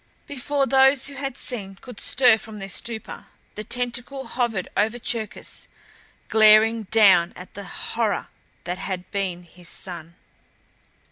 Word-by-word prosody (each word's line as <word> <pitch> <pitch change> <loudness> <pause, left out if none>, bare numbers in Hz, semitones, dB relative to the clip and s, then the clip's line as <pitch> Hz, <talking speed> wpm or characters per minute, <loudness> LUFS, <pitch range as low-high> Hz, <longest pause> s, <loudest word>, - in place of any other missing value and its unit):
Before 285 0 -1
those 270 0 +4
who - - -9
had 275 -2 -4
seen 200 -6 -3
could 245 +3 -11
stir 245 -4 +4
from 220 -1 -9
their 195 -1 -6
stupor 225 +2 -6 0.3
the 210 - -6
tentacle 245 +3 -3
hovered 235 -7 -1
over 220 +3 +1
Cherkis, 225 -2 -4 0.6
glaring 220 +1 +6
down 195 -5 +5
at 180 - -11
the 200 0 -8
horror 225 0 -2 0.3
that 180 +1 -4
had 185 -2 -5
been 185 -3 -2
his 175 0 -11
son. 170 -2 -7
220 Hz, 135 wpm, -24 LUFS, 195-245 Hz, 0.6 s, glaring